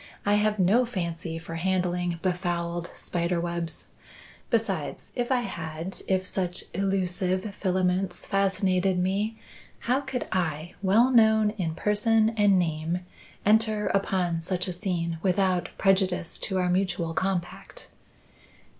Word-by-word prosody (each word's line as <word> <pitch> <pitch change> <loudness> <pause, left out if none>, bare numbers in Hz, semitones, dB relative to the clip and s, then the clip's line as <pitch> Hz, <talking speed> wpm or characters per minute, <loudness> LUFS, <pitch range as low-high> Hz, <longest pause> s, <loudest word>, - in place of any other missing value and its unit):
I 205 - +3
have 210 0 +2
no 200 +7 +4
fancy 170 -7 -4
for 165 0 -6
handling 180 -1 0
befouled 175 -2 -1
spider 170 0 -1
webs. 170 -2 -3 0.6
Besides, 200 -9 -1
if 245 +1 -2
I 255 -1 +3
had 165 -4 -5
if 185 -1 +1
such 180 -1 -2
elusive 190 +1 -1
filaments 185 -1 0
fascinated 190 -2 +1
me 200 +5 0 0.4
how 250 +3 +1
could 265 -3 -4
I, 165 -2 -1
well 220 +6 +4
known 220 -3 +5
in 175 -7 -3
person 215 +3 +2
and 205 -3 +4
name, 165 0 -1 0.4
enter 215 0 +3
upon 185 -4 0
such 180 +2 -2
a 180 - -2
scene 170 -3 -2
without 185 -1 +1
prejudice 190 -3 +2
to 190 - -1
our 180 -1 +1
mutual 180 -3 0
compact?" 190 - -3
185 Hz, 125 wpm, -27 LUFS, 175-205 Hz, 0.6 s, known